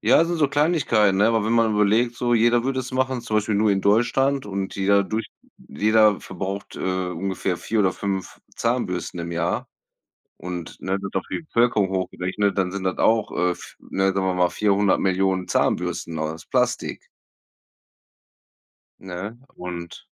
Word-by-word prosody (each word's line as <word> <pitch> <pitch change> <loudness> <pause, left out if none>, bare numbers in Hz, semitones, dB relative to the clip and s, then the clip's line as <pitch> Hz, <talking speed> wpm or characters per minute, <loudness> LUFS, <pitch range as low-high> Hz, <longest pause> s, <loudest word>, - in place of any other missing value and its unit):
ja, - - +5
also, 170 +2 +2
so 150 -3 +2
Kleinigkeiten, 140 - +2
ne, 105 +2 +4
aber 115 -2 +1
wenn 115 - +1
man 115 -2 +3
überlegt, 110 +3 +2
so 120 0 +1
jeder 120 +1 +4
würde 130 0 -1
es 130 +1 -7
machen, 130 -1 0
zum 110 -2 -1
Beispiel 105 0 -1
nur 105 +1 +3
in 95 -1 +2
Deutschland, 125 +7 +2
und 95 -1 -4
jeder 100 +1 +3
durch 110 +3 -3 0.3
jeder 105 +4 +2
verbraucht, 95 +2 -6
äh, 95 -1 -1
ungefähr 90 0 -2
4 110 - -2
oder 95 -2 +3
5 95 -2 -4 0.2
Zahnbürsten 115 -7 -2
im 85 0 -5
Jahr, 85 - -1 0.7
und, 90 -2 -6
ne, 95 +1 -1
wird 100 0 -6
auf 95 - 0
die - - -2
Bevölkerung 120 -8 +2
hochgerechnet, 95 +1 -1
dann 95 -2 +1
sind 100 -1 -4
das 95 -1 -1
auch, 110 -1 +2
äh, 90 0 0
v - - -14 0.2
ne, 95 0 -1
sagen 95 0 0
wir 95 - +1
mal 90 -1 +3
400.000.000 95 -2 +1
Zahnbürsten 80 -1 -1
aus 80 +1 -4
Plastik. - - -1 2.0
Ne, 95 +5 -7 0.2
und 85 -1 -7
100 Hz, 165 wpm, -23 LUFS, 95-115 Hz, 2.0 s, ja